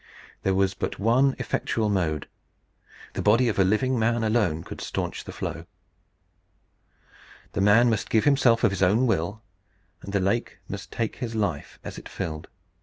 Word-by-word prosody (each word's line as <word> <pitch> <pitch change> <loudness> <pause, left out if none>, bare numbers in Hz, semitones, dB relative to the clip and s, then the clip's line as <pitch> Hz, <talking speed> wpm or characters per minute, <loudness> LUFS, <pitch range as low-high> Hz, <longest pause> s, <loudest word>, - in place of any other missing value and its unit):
There 95 -1 +1
was 95 0 +2
but - - -4
one 130 +6 +3
effectual 110 -2 -1
mode. 85 -7 0 0.9
The - - -3
body 115 +4 +4
of 100 - -2
a - - +6
living 115 +6 +1
man 115 +1 +1
could 110 - +1
alone 100 -9 +1 0.2
stanch - - -4
the - - -7
flow. - - -5 1.8
The - - -1
man 105 +5 +6
must 110 -3 0
give 110 - +3
himself 135 -5 +4
of 115 - +4
his 95 - -3
own 105 +7 +4
will; 105 0 -1 0.6
and 100 - -8
the 100 - +1
lake 100 +6 -1
must 100 -2 -7
take 115 -3 -2
his 115 -2 -4
life 100 -9 -2
as - - -7
it - - -12
filled. 80 -1 -5
105 Hz, 170 wpm, -26 LUFS, 95-115 Hz, 1.8 s, a